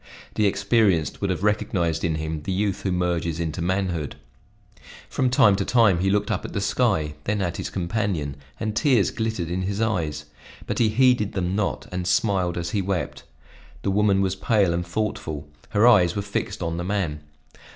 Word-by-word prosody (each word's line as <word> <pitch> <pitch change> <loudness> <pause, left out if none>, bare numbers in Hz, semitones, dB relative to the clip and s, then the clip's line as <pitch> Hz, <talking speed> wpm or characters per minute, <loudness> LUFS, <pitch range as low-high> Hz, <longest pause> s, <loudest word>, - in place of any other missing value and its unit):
The 105 - +2
experienced 100 -4 +1
would 100 - 0
have 90 +1 -2
recognized 85 -6 0
in 80 -2 +1
him 80 0 -3
the 75 - -4
youth 100 +1 -1
who 95 - -1
merges 85 -2 -1
into 85 0 -3
manhood. 90 -4 -1 0.9
From 130 - 0
time 110 -5 +5
to 100 - 0
time 105 -6 +4
he 95 +2 +1
looked 105 +1 +1
up - - -1
at - - -7
the - - -1
sky, 100 -8 +1
then 105 0 0
at 90 -3 -2
his - - -4
companion, 90 -6 -2 0.2
and 110 -1 -2
tears 120 -4 +3
glittered 110 -7 -2
in 90 +1 -1
his 100 +2 -2
eyes, 90 -10 -1 0.4
but - - -3
he 115 -2 +4
heeded 120 -2 +3
them 95 -1 -1
not, 105 -2 -1
and 90 -1 -3
smiled 95 -3 +1
as 85 0 -3
he 100 - 0
wept. 95 -2 -3 0.6
The 100 - +1
woman 100 -1 +3
was 95 -1 0
pale 100 -3 +2
and 85 +1 -1
thoughtful, 85 -6 -3 0.2
her 105 +3 +4
eyes 90 -8 +5
were 100 - -2
fixed 100 -1 -3
on 85 0 -2
the 85 - -3
man. 90 -6 -1
95 Hz, 190 wpm, -24 LUFS, 85-105 Hz, 0.9 s, time